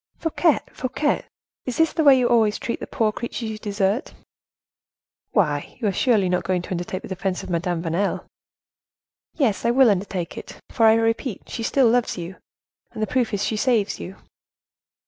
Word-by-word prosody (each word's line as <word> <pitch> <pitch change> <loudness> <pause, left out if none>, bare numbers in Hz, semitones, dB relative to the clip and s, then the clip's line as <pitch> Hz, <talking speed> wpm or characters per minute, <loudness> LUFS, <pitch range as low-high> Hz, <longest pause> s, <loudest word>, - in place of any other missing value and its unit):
"Fouquet! 325 -1 +2 0.2
Fouquet! 270 +3 -1 0.4
Is 250 - -3
this 325 -1 +3
the 320 - +1
way 280 -3 +7
you 250 -1 +2
always 225 -3 +3
treat 235 - -4
the - - -6
poor 220 -2 +1
creatures 230 0 -5
you 215 - -7
desert?" 205 +2 -1 1.1
"Why, 150 -9 0
you 215 -5 +1
surely 215 0 +2
are - - 0
not 180 0 0
going 180 0 -1
to 190 - -10
undertake 180 +1 -3
the - - -7
defense 190 -1 -3
of - - -7
Madame 170 0 -1
Vanel?" 175 +4 -1 1.1
"Yes, 225 - +1
I 235 - +2
will 250 -1 +5
undertake 185 -3 -3
it; - - -11
for, 225 -2 +4
I 220 - +7
repeat, 225 0 -1
she 235 - -5 0.2
loves 240 -2 +2
you 170 0 -5
still, - - -24 0.5
and 215 - -3
the - - +3
proof 240 +3 0
is 205 -1 -1
she 220 - -1
saves 225 -4 +1
you." 190 - -7
215 Hz, 185 wpm, -23 LUFS, 185-240 Hz, 1.1 s, way